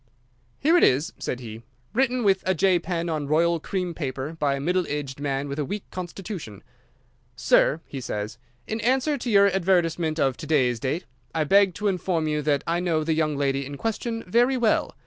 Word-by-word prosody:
"Here 320 +5 +3
it - - +2
is," 140 +5 +3
said 125 - -4
he, 110 -1 -8 0.3
"written 255 0 +1
with 195 -2 +3
a 190 - +2
J 185 +1 +3
pen 170 0 -3
on 155 -3 -2
royal 165 +3 +2
cream 180 +1 -3
paper 140 -1 -4
by 145 -4 0
a - - -4
middle 180 +4 0
aged 145 -2 -4
man 140 -1 -2
with 140 +1 -4
a - - +1
weak 200 +8 -4
constitution. 175 - -7 0.7
'Sir,' 155 - +3
he 135 - -7
says, 105 0 -4 0.3
'in 220 +1 -3
answer 265 +6 +2
to 240 - -3
your 200 -2 +6
advertisement 175 -4 +1
of 135 -3 +1
to 155 - -8
day's 130 -6 +2
date, 145 +9 -2 0.3
I 160 - +2
beg 195 +2 +4
to 210 - -1
inform 180 -4 0
you 150 0 0
that 145 -1 +1
I 170 +2 0
know 165 -3 0
the 160 +1 0
young 155 -2 0
lady 140 -1 0
in 140 +1 -7
question 225 - -3
very 240 +7 +3
well. 235 -3 +1
165 Hz, 200 wpm, -25 LUFS, 140-195 Hz, 0.7 s, your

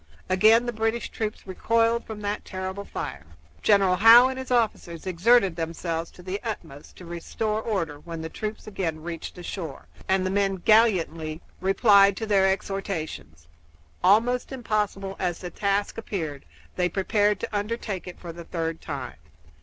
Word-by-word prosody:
Again 220 +5 +5
the 240 - -2
British 225 +1 -1
troops 215 -1 -4
recoiled 230 +4 +1
from 215 -1 -7
that 205 0 -3
terrible 190 +1 -5
fire. 70 - -6 0.3
General 195 -3 +4
Howe 230 +5 +9
and 260 0 -5
his 260 - -7
officers 220 -9 0
exerted 190 +1 +3
themselves 165 0 -3
to 180 - -15
the 190 +2 -3
utmost 165 - -7
to 180 - -11
restore 210 +6 -3
order 170 -10 -2
when 165 +1 -7
the - - -3
troops 215 +6 -6
again 170 -7 -3
reached 170 -1 -6
the 180 - -9
shore, 170 -6 -6 0.2
and 190 0 +2
the 185 - 0
men 195 -1 +1
gallantly 175 -7 +2 0.2
replied 200 0 +5
to 225 - -3
their 195 -3 +4
exhortations. 165 - -4 0.6
Almost 235 +7 +3
impossible 210 -6 -2
as 180 -2 -1
the 180 -1 -7
task 200 +1 -1
appeared, 160 - -5 0.3
they 180 0 +2
prepared 205 +2 +1
to - - -4
undertake 205 -2 -3
it 180 - -9
for 170 -2 -8
the 170 0 -10
third 165 -1 -3
time. 135 - -6
195 Hz, 160 wpm, -25 LUFS, 170-215 Hz, 0.6 s, Howe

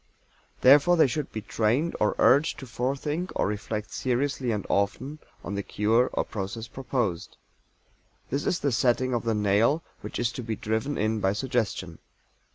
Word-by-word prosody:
Therefore 145 +7 +6
they 160 - +6
should 140 +2 -2
be 110 - -5
trained 120 +11 0
or 105 - +2
urged 145 +5 +4
to 140 - -8
forethink 140 +8 -2
or - - +1
reflect 105 +1 -3
seriously 130 0 -1
and 105 -3 -2
often 125 +9 -1 0.2
on 100 - -5
the 100 - -1
cure 110 +5 +2
or - - +1
process 110 +3 -5
proposed. 120 -10 -3 0.9
This 140 +2 -1
is 180 - 0
the 140 - +1
setting 130 +1 +2
of 120 -1 -1
the 115 -1 +1
nail, 105 +10 +2 0.2
which - - -6
is 120 0 0
to 125 - -6
be 115 -2 -3
driven 110 +8 -2
in 110 +1 0
by 95 -1 +1
suggestion. 110 - -2
120 Hz, 165 wpm, -27 LUFS, 105-135 Hz, 0.9 s, Therefore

